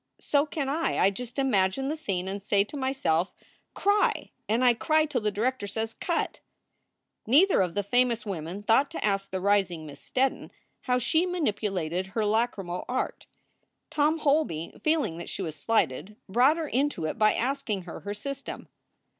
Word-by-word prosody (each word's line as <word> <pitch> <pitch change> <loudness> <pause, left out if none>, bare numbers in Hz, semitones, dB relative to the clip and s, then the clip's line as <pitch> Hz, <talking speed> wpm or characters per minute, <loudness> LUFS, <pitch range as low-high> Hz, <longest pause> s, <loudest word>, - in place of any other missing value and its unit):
So 285 +1 +2
can 295 -2 -3
I. 315 +4 0
I 195 - +4
just 245 +5 -7
imagine 260 -2 +2
the 300 - -1
scene 190 - -3
and 195 +1 -4
say 200 0 +2
to 210 - -11
myself, 260 - 0 0.4
Cry! 410 +1 +2 0.2
and 235 +4 +2
I 245 - +7
cry 310 +6 +2
till 280 -6 -2
the 210 - +1
director 220 +1 -1
says, 220 +2 -3
Cut! 340 -2 -2 0.4
" - - -48
Neither 310 - +5
of 180 -1 -1
the 205 - 0
famous 235 +1 +2
women 185 0 -5
thought 230 +7 +4
to 330 - -3
ask 195 -1 0
the 190 - -3
rising 190 -4 +1
Miss 145 -2 -11
Steddon 265 +1 0 0.4
how 250 -1 +2
she 320 +8 +2
manipulated 195 - -1
her 210 +3 -1
lachrymal 205 -5 0
art. 255 - -2 0.6
Tom 305 +2 +2
Holby, 285 - 0
feeling 300 - +1
that 170 - -7
she 195 - -4
was 160 -3 -4
slighted, 195 - 0
brought 250 - +4
her 325 -2 -2
into 270 - 0
it 155 - -3
by 215 0 +4
asking 245 -6 -1
her 175 - -8
her 205 +1 -5
system. 275 +6 -6
225 Hz, 175 wpm, -27 LUFS, 195-275 Hz, 0.6 s, I